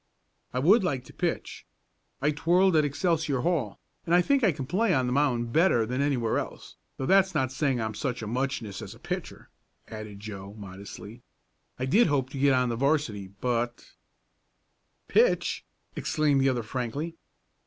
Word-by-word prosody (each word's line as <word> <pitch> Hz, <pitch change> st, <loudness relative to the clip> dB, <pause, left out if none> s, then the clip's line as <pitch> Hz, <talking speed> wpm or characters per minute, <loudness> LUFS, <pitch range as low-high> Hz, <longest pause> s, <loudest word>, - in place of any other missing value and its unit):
"I -, -, -4 dB
would 190 Hz, -, +5 dB
like 135 Hz, -8 st, -1 dB
to -, -, -15 dB
pitch. -, -, -3 dB, 0.6 s
I 150 Hz, -, +3 dB
twirled 175 Hz, +4 st, +3 dB
at 155 Hz, -, +5 dB
Excelsior 150 Hz, -2 st, 0 dB
Hall, 145 Hz, -, -1 dB, 0.2 s
and 170 Hz, -, +2 dB
I 180 Hz, -, +5 dB
think 275 Hz, +3 st, +2 dB
I 200 Hz, -, +5 dB
can 140 Hz, -3 st, -5 dB
play 185 Hz, -, +2 dB
on 130 Hz, -2 st, +2 dB
the 125 Hz, -, -1 dB
mound 120 Hz, -5 st, +1 dB
better 160 Hz, -9 st, +4 dB
than 125 Hz, +4 st, -2 dB
anywhere 130 Hz, -6 st, +1 dB
else, -, -, -8 dB, 0.2 s
though 135 Hz, -, -3 dB
that's 190 Hz, +2 st, +4 dB
not 130 Hz, -4 st, +1 dB
saying 135 Hz, -2 st, 0 dB
I'm 110 Hz, -1 st, -2 dB
such 125 Hz, 0 st, -3 dB
a -, -, -4 dB
muchness 120 Hz, -4 st, -2 dB
as -, -, -8 dB
a -, -, -17 dB
pitcher," -, -, -6 dB, 0.4 s
added 110 Hz, -2 st, -8 dB
Joe, 100 Hz, -1 st, -8 dB
modestly. 100 Hz, +3 st, -10 dB, 0.6 s
"I 130 Hz, -, -2 dB
did 205 Hz, -, +4 dB
hope 135 Hz, -3 st, 0 dB
to 135 Hz, -, -5 dB
get 140 Hz, 0 st, +4 dB
on 125 Hz, -1 st, +2 dB
the 115 Hz, -, -1 dB
'varsity, 130 Hz, -7 st, 0 dB
but 120 Hz, +4 st, -3 dB, 0.6 s
" -, -, -47 dB
"Pitch!" 485 Hz, +2 st, +2 dB, 0.3 s
exclaimed 150 Hz, -3 st, +1 dB
the 135 Hz, -, +4 dB
other 125 Hz, -3 st, -1 dB
frankly. 130 Hz, +8 st, -4 dB
130 Hz, 175 wpm, -27 LUFS, 115-155 Hz, 0.6 s, would